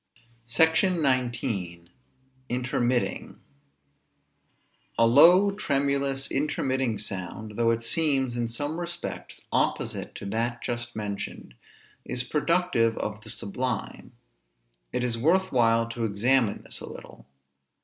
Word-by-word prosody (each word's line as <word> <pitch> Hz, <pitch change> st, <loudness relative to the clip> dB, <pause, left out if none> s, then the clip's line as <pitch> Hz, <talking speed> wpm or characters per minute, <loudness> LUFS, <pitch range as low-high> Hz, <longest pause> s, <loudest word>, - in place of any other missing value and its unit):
SECTION 160 Hz, -, +3 dB
XIX. 115 Hz, -10 st, -1 dB, 0.6 s
INTERMITTING. 125 Hz, 0 st, -1 dB, 1.6 s
A 115 Hz, -, +5 dB
low, 170 Hz, -, +7 dB
tremulous, 140 Hz, -6 st, 0 dB
intermitting 130 Hz, -4 st, 0 dB
sound, 100 Hz, +1 st, -4 dB
though 115 Hz, 0 st, +2 dB
it 115 Hz, 0 st, 0 dB
seems, 135 Hz, -3 st, +2 dB
in 120 Hz, -1 st, -1 dB
some 145 Hz, +8 st, -3 dB
respects, 175 Hz, 0 st, -6 dB
opposite -, -, -1 dB
to -, -, -7 dB
that 115 Hz, +4 st, -2 dB
just 120 Hz, 0 st, -4 dB
mentioned, 100 Hz, -, -5 dB, 0.5 s
is 125 Hz, 0 st, -3 dB
productive 150 Hz, -5 st, +1 dB
of 105 Hz, 0 st, -4 dB
the -, -, -8 dB
sublime. 125 Hz, +3 st, -3 dB, 0.8 s
It 125 Hz, -, -1 dB
is 115 Hz, -2 st, -1 dB
worth 180 Hz, +9 st, +2 dB
while 115 Hz, -2 st, +3 dB
to 115 Hz, 0 st, -4 dB
examine 110 Hz, +2 st, +2 dB
this -, -, -5 dB
a -, -, -8 dB
little. -, -, -12 dB
125 Hz, 110 wpm, -26 LUFS, 115-140 Hz, 1.6 s, low